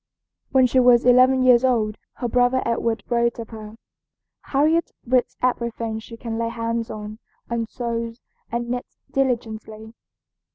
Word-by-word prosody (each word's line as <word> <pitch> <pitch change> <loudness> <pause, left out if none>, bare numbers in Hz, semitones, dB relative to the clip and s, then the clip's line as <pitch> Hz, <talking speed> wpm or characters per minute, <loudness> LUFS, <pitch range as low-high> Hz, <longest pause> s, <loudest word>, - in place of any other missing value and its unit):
When 260 -1 +5
she 255 +1 +3
was 245 -1 +5
eleven 255 +1 +5
years 250 -1 +6
old 220 -5 +1
her 245 - -3
brother 245 +2 +2
Edward 230 -2 -1
wrote 235 -1 +1
of 230 -1 -7
her: 215 -1 -9 0.7
"Harriet 315 +4 +2 0.2
reads 250 0 +1
everything 235 -3 -1
she 230 +1 -11
can 230 -1 -4
lay 230 0 -1
hands 230 0 -3
on, 215 +1 -7 0.3
and 230 -1 -2
sews 230 -1 -4 0.3
and 235 0 -2
knits 250 0 -5
diligently." 220 -4 -2
235 Hz, 140 wpm, -23 LUFS, 225-250 Hz, 0.7 s, years